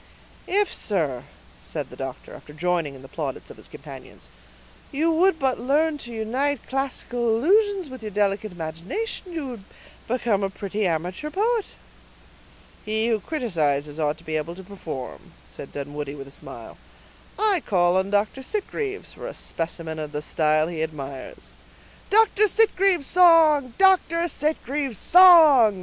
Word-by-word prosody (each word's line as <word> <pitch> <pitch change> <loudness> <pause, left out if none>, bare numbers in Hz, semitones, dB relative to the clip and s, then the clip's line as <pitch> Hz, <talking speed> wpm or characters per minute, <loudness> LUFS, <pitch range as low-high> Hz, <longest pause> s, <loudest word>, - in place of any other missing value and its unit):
"If, 405 +2 +2
sir," 155 - -2 0.4
said - - -6
the - - -10
doctor, - - -7
after 150 - -12
joining 165 -3 -1
in 130 - -13
the - - -11
plaudits 140 -3 -6
of - - -13
his - - -12
companions, - - -12 0.6
"you 315 +4 +1
would 350 +2 +3
but 265 -4 0
learn 295 +5 +1
to 240 - -8
unite 250 +5 -1
classical 255 -3 -2
allusions 385 - +2
with 260 -2 -10
your 215 - -5
delicate 205 +1 0
imagination 180 - -5
you 320 -5 -4
would 235 -5 -8 0.4
become 230 -4 0
a 195 - 0
pretty 200 +1 -3
amateur 180 - -3
poet." 435 +5 0 1.2
"He 220 +2 +1
who 225 -2 +1
criticizes 155 - -1
ought 150 -1 0
to - - -18
be 155 0 -2
able 160 +3 -4
to 190 - -10
perform," 170 -9 -8
said 140 - -10
Dunwoodie 145 0 -6
with 135 -1 -9
a - - -14
smile. - - -11 0.6
"I 410 -5 +2
call 175 -2 +2
on 190 +1 +1
Dr. 205 +6 0
Sitgreaves 410 +5 -4
for - - -8
a - - -7
specimen 165 -1 -5
of 150 -1 -6
the 150 0 -3
style 155 0 +1
he 165 -2 -4
admires." 140 -4 -7 0.6
"Dr. 430 0 +4
Sitgreaves' 390 -7 +3
song! 315 -8 +5
Dr. 365 -3 +3
Sitgreaves' 290 - -2
song!" 310 - +7
220 Hz, 150 wpm, -24 LUFS, -, 1.2 s, song